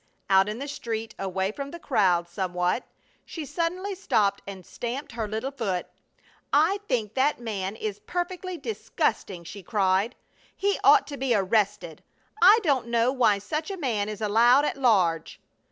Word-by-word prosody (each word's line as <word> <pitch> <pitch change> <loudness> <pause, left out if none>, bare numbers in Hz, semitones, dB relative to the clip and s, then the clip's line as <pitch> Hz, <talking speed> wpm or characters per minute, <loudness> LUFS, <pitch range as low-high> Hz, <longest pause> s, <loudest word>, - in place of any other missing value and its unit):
Out 195 +1 +5
in 215 - -4
the 280 +3 -5
street, 225 -6 -4
away 190 0 -1
from 280 +5 -6
the 340 - -8
crowd 185 - +2
somewhat, 180 +3 -1 0.4
she 320 -3 -7
suddenly 360 +7 -2
stopped 215 - +1
and 190 -3 -8
stamped 245 +4 -5
her 225 -2 -3
little 220 +6 -3
foot: 200 -10 -2 0.7
"I 320 +8 +3
think 220 -5 -1
that 270 +1 +1
man 205 -4 -4
is 210 -2 -4
perfectly 360 0 -3
disgusting!" 200 - -2
she 200 +4 -9
cried. 195 +3 +1 0.4
"He 400 0 0
ought - - +6
to 285 - -7
be 260 -3 +1
arrested! 200 -4 0 0.4
I 395 +5 +8
don't 270 -8 +1
know 235 +1 +2
why 235 -6 +3
such 305 - -4
a 390 - -4
man 225 - -1
is 215 0 -6
allowed 235 +6 +5
at - - -1
large!" 185 - +2
225 Hz, 160 wpm, -26 LUFS, 195-285 Hz, 0.7 s, I